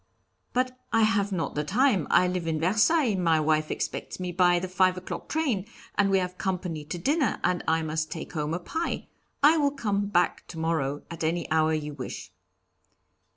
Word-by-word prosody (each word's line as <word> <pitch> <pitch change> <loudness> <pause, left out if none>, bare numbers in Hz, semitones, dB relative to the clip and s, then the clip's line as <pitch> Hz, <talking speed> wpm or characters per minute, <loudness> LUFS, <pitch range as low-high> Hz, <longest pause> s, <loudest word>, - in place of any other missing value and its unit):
'But 255 0 -1
I 225 0 +4
have 210 -2 +2
not 175 -4 -2
the 150 - -1
time; 210 - +2
I 180 - +5
live 180 -2 -2
in 160 -1 0
Versailles; 215 - +3
my 170 -4 +2
wife 155 0 +1
expects - - -4
me 180 -1 -3
by 175 0 +4
the 180 +2 -2
five 185 0 +2
o'clock 185 - -6
train, 260 -12 0 0.3
and 205 -1 +2
we 195 - +4
have 180 -1 -3
company 180 -5 -2
to 160 +4 -5
dinner, 285 - +1
and 180 -1 +1
I 160 0 +2
must 155 0 -2
take 165 +1 -7
home 155 0 -1
a - - -3
pie. 325 - -3 0.3
I 310 +3 +7
will 290 -2 +3
come 205 -8 -1
back 175 -3 +1
to 170 - -9
morrow 155 -3 -1
at 165 -1 -6
any 165 +1 0
hour 160 0 +3
you 150 -1 -4
wish.' 130 -3 -7
180 Hz, 195 wpm, -27 LUFS, 160-210 Hz, 0.3 s, I